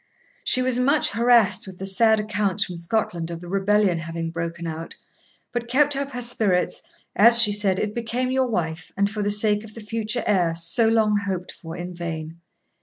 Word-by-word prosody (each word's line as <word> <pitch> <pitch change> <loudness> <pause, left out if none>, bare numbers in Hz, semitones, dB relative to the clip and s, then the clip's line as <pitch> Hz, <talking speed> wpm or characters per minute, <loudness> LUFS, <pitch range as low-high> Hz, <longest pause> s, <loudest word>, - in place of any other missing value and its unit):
She 255 - +1
was 255 -1 +1
much 280 +4 +3
harassed 225 -4 +3
with 185 -1 -10
the 190 - -6
sad 220 +3 +3
accounts 210 -2 -1
from 180 - -7
Scotland 170 -1 -2
of 170 -1 -6
the 175 - -11
rebellion 195 -1 +1
having 165 0 -5
broken 170 0 -5
out; 165 0 -6 0.6
but 240 -1 -4
kept 285 +3 +2
up 280 0 -3
her 245 0 -4
spirits, 210 -7 0 0.3
as, 235 +3 +7
she 220 -3 +7
said, 205 -2 +1
it 210 +1 -2
became 240 +2 -2
your 260 0 +1
wife, 165 -7 -3
and 200 0 +2
for 210 +1 -5
the 205 - 0
sake 210 0 +2
of 215 -1 -13
the - - -8
future 220 +2 -2
heir, 175 -5 +1
so 170 +7 +1
long 220 -2 +2
hoped 190 -3 -4
for 165 +1 -10
in 175 +1 -6
vain. 165 -1 -6
205 Hz, 195 wpm, -23 LUFS, 175-230 Hz, 0.6 s, as